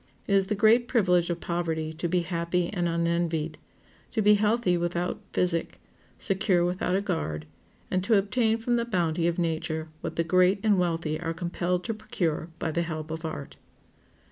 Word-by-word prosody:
It 200 Hz, -, +1 dB
is 195 Hz, -1 st, +4 dB
the 210 Hz, -, 0 dB
great 225 Hz, +4 st, +4 dB
privilege 180 Hz, -8 st, +3 dB
of 175 Hz, 0 st, -2 dB
poverty 160 Hz, -2 st, -2 dB
to 165 Hz, +2 st, -3 dB
be 180 Hz, +1 st, +2 dB
happy 170 Hz, 0 st, -1 dB
and 175 Hz, -3 st, 0 dB
unenvied, 170 Hz, -2 st, 0 dB, 0.5 s
to 220 Hz, -, 0 dB
be 210 Hz, +1 st, +7 dB
healthy 210 Hz, -2 st, +2 dB
without 175 Hz, +1 st, -1 dB
physic, 170 Hz, -2 st, 0 dB, 0.4 s
secure 190 Hz, -3 st, +1 dB
without 180 Hz, +1 st, 0 dB
a 195 Hz, -, +2 dB
guard, 120 Hz, -, -2 dB, 0.5 s
and 185 Hz, 0 st, +1 dB
to 220 Hz, 0 st, +4 dB
obtain 220 Hz, +3 st, +2 dB
from 240 Hz, +1 st, 0 dB
the 235 Hz, -, 0 dB
bounty 170 Hz, -6 st, 0 dB
of 170 Hz, -, 0 dB
nature 160 Hz, -2 st, -2 dB
what -, -, -4 dB
the 165 Hz, -, +1 dB
great 185 Hz, +3 st, +3 dB
and 210 Hz, -4 st, +4 dB
wealthy 165 Hz, -3 st, 0 dB
are 165 Hz, -1 st, -3 dB
compelled 175 Hz, +1 st, -1 dB
to 225 Hz, -, -2 dB
procure 175 Hz, -7 st, -2 dB
by 160 Hz, -, -2 dB
the 170 Hz, -, 0 dB
help 155 Hz, -2 st, -4 dB
of 160 Hz, +1 st, -5 dB
art. 155 Hz, -3 st, -6 dB
175 Hz, 180 wpm, -27 LUFS, 165-195 Hz, 0.5 s, be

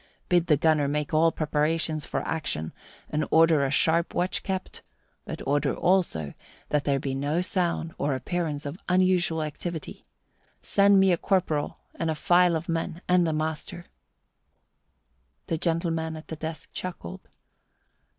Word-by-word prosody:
Bid 175 Hz, -1 st, +3 dB
the 150 Hz, -, +4 dB
gunner 155 Hz, -1 st, +3 dB
make 150 Hz, +2 st, -2 dB
all 165 Hz, +1 st, +4 dB
preparations 155 Hz, 0 st, 0 dB
for -, -, -3 dB
action 80 Hz, -, -2 dB, 0.4 s
and 155 Hz, 0 st, 0 dB
order 160 Hz, -2 st, +5 dB
a 135 Hz, -, +1 dB
sharp 165 Hz, +4 st, +1 dB
watch 180 Hz, +1 st, 0 dB
kept; 190 Hz, -1 st, -4 dB, 0.4 s
but -, -, -6 dB
order 145 Hz, +2 st, +1 dB
also 170 Hz, -, +1 dB, 0.4 s
that 150 Hz, -1 st, 0 dB
there 140 Hz, -1 st, +2 dB
be 135 Hz, 0 st, -3 dB
no 145 Hz, +5 st, 0 dB
sound 175 Hz, -3 st, -1 dB
or 140 Hz, -1 st, 0 dB
appearance 150 Hz, +2 st, -3 dB
of 145 Hz, +6 st, -5 dB
unusual 180 Hz, -3 st, +2 dB
activity. 160 Hz, +1 st, -6 dB, 0.6 s
Send 200 Hz, 0 st, +4 dB
me 190 Hz, -1 st, +5 dB
a 175 Hz, -, +3 dB
corporal 165 Hz, -6 st, 0 dB, 0.2 s
and 165 Hz, -, -2 dB
a 160 Hz, -, 0 dB
file 175 Hz, +2 st, +4 dB
of 160 Hz, +1 st, -3 dB
men, 165 Hz, +1 st, -3 dB
and 180 Hz, -1 st, +4 dB
the -, -, +1 dB
master." 155 Hz, +2 st, -4 dB, 1.6 s
The 165 Hz, -, -2 dB
gentleman 165 Hz, -1 st, -1 dB
at 155 Hz, -, -11 dB
the 160 Hz, -, -4 dB
desk 160 Hz, 0 st, -7 dB
chuckled. 175 Hz, -, -7 dB
160 Hz, 150 wpm, -26 LUFS, 150-175 Hz, 1.6 s, order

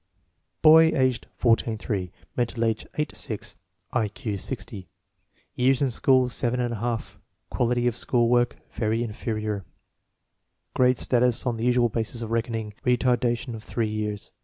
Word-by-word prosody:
Boy; 160 Hz, +1 st, +9 dB
age 130 Hz, -2 st, +2 dB
14 115 Hz, -1 st, +2 dB
8; 95 Hz, -4 st, -1 dB, 0.2 s
mental 120 Hz, -1 st, 0 dB
age 110 Hz, -1 st, -1 dB
8 150 Hz, 0 st, -2 dB
6; 105 Hz, -4 st, -5 dB, 0.4 s
I 115 Hz, -4 st, +2 dB
Q 105 Hz, +1 st, -5 dB
60; 100 Hz, 0 st, -3 dB, 0.7 s
years 130 Hz, +1 st, +3 dB
in 135 Hz, -3 st, +1 dB
school 130 Hz, +2 st, +3 dB
seven 125 Hz, 0 st, -1 dB
and 120 Hz, -1 st, -1 dB
a -, -, -4 dB
half; 115 Hz, +1 st, -4 dB, 0.3 s
quality 120 Hz, 0 st, +1 dB
of 120 Hz, -2 st, +1 dB
school 120 Hz, -1 st, +1 dB
work 120 Hz, 0 st, +2 dB, 0.2 s
"very 110 Hz, +1 st, 0 dB
inferior"; 110 Hz, -2 st, -3 dB, 1.1 s
grade 125 Hz, -1 st, +3 dB
status 125 Hz, 0 st, +2 dB
on 120 Hz, -2 st, 0 dB
the 115 Hz, -, -2 dB
usual 125 Hz, -1 st, +3 dB
basis 115 Hz, +1 st, -3 dB
of 115 Hz, -, -6 dB
reckoning, 115 Hz, -2 st, -2 dB
retardation 125 Hz, -1 st, +1 dB
of 110 Hz, -, -7 dB
three 115 Hz, -2 st, -2 dB
years. 105 Hz, -1 st, -4 dB
120 Hz, 150 wpm, -25 LUFS, 110-125 Hz, 1.1 s, Boy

